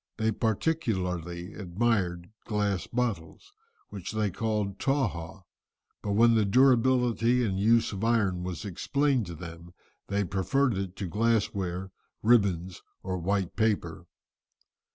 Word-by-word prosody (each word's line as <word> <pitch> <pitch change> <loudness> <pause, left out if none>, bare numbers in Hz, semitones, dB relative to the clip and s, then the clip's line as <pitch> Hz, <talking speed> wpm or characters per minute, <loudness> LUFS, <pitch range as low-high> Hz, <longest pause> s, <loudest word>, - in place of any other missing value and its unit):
They 110 0 +1
particularly 95 - -1
admired 90 -3 -1
glass 105 -3 -1
bottles, 120 - -3 0.4
which 100 0 -6
they 105 -2 0
called 105 -1 -2
Tawhaw, 95 - -1 0.6
but 100 - -2
when 115 +3 +5
the 110 -1 +3
durability 125 +1 +3
and 95 -3 -1
use 115 +3 +3
of 100 +2 -4
iron 105 -6 +2
was 90 +2 -5
explained 130 +4 0
to 85 - -7
them 85 +1 -10 0.3
they 100 +1 0
preferred 105 +7 +1
it 95 -1 -4
to 95 - -4
glass 110 +3 +1
ware, 95 -1 -4 0.3
ribbons, 95 -6 +2 0.2
or 95 -1 -3
white 95 +1 -1
paper. 110 -2 -1
100 Hz, 125 wpm, -28 LUFS, 90-115 Hz, 0.6 s, when